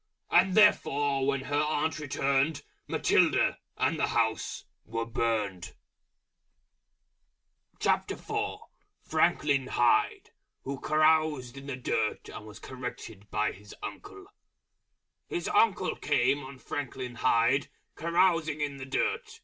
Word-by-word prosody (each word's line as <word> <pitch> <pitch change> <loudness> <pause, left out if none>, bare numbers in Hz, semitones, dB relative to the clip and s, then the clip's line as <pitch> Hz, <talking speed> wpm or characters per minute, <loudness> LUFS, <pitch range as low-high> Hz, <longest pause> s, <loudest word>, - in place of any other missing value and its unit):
And 190 -1 +4
therefore 145 -10 +3
when 140 -1 +1
her 145 +2 0
Aunt 155 +1 0
returned, 140 +1 0 0.2
Matilda, - - +2 0.2
and - - +1
the - - +2
House, - - -1 0.2
were 115 +1 -3
Burned. 110 -5 -2 2.0
FRANKLIN 140 -3 -1
HYDE, 120 -2 +2 0.3
Who 135 0 -5
caroused 155 -4 +2
in 135 0 -10
the 140 - -3
Dirt 110 -3 -2
and 110 - -9
was 105 - -11
corrected 115 -5 -8
by 105 0 0
His 105 +2 -13
Uncle. - - -8 1.0
His 175 - -3
Uncle 200 -5 +2
came 140 0 +1
on 135 0 -10
Franklin 130 -1 -5
Hyde 125 +3 +2 0.3
Carousing 165 -2 +2
in 145 -2 -2
the 130 -1 -8
Dirt. 450 - -2
140 Hz, 110 wpm, -29 LUFS, 120-155 Hz, 2.0 s, And